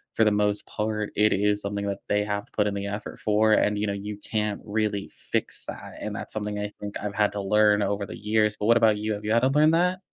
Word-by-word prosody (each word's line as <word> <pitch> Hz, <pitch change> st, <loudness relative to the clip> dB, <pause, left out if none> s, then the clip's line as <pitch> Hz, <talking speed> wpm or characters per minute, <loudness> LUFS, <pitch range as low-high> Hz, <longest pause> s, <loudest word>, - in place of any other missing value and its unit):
for 110 Hz, -, +4 dB
the 105 Hz, -, +4 dB
most 105 Hz, 0 st, +1 dB
part, 105 Hz, -1 st, -2 dB
it 105 Hz, +1 st, +4 dB
is 105 Hz, +1 st, +1 dB
something 100 Hz, 0 st, -3 dB
that 100 Hz, -, -3 dB
they 105 Hz, 0 st, +2 dB
have 105 Hz, -1 st, -2 dB
to -, -, -33 dB
put 105 Hz, -1 st, +2 dB
in 100 Hz, -, -1 dB
the 100 Hz, 0 st, -3 dB
effort 100 Hz, +1 st, -6 dB
for, 110 Hz, +1 st, +3 dB
and, 105 Hz, 0 st, +3 dB
you 105 Hz, -, 0 dB
know, 100 Hz, -, -1 dB
you 100 Hz, +1 st, -5 dB
can't 105 Hz, 0 st, -2 dB
really 105 Hz, -1 st, -1 dB
fix -, -, -3 dB
that. -, -, -8 dB
And -, -, -4 dB
that's -, -, -5 dB
something 105 Hz, -1 st, -3 dB
I 105 Hz, 0 st, -3 dB
think 100 Hz, 0 st, -5 dB
I've 100 Hz, 0 st, -4 dB
had 105 Hz, -1 st, +2 dB
to 100 Hz, -, -3 dB
learn 105 Hz, +1 st, +4 dB
over 100 Hz, 0 st, -1 dB
the -, -, -8 dB
years. 105 Hz, 0 st, +1 dB
But 105 Hz, -, -1 dB
what 115 Hz, 0 st, +6 dB
about 110 Hz, -2 st, +4 dB
you, 105 Hz, +1 st, -2 dB
have 105 Hz, 0 st, -6 dB
you 105 Hz, -, -1 dB
had 115 Hz, -, +4 dB
to -, -, +5 dB
learn 150 Hz, +3 st, +4 dB
that? 180 Hz, +3 st, +2 dB
105 Hz, 275 wpm, -26 LUFS, 105-110 Hz, -, what